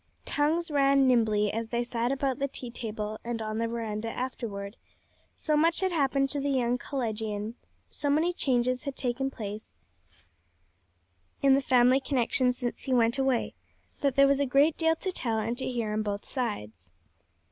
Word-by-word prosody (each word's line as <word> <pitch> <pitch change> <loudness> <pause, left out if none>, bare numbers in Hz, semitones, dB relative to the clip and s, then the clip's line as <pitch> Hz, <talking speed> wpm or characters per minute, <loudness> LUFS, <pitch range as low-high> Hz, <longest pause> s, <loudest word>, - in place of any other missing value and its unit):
Tongues 315 +3 0
ran 275 -1 +4
nimbly 215 -5 +2
as 225 +1 -2
they 240 +1 0
sat 240 0 -1
about 275 -1 -1
the 280 - 0
tea 250 -3 -6
table 215 -2 -4
and 235 -1 -3
on 215 0 -3
the 230 - 0
veranda 225 -1 -3
afterward; 225 -5 -5 0.6
so 305 - 0
much 330 +4 +3
had 380 -1 +1
happened 275 -4 +1
to 290 - -1
the 285 +1 -1
young 250 -2 +1
collegian, 220 -5 -3 0.4
so 290 - -2
many 320 +5 +2
changes 255 -3 +1
had 280 -2 -4
taken 260 +2 -1
place 215 -4 -7 1.7
in 275 -1 +6
the 275 - +4
family 255 0 +4
connection 255 -1 +1
since 245 -1 -4
he 260 - 0
went 235 +2 +2
away, 265 -3 +1 0.5
that 275 -3 +1
there 275 - +6
was 275 0 +3
a 285 - +2
great 285 +5 +4
deal 325 0 +2
to 375 +3 -3
tell 230 -10 -1
and 225 +2 -1
to - - -1
hear 230 -4 -2
on 215 - 0
both 205 -1 -3
sides. 210 - -4
250 Hz, 175 wpm, -28 LUFS, 225-275 Hz, 1.7 s, in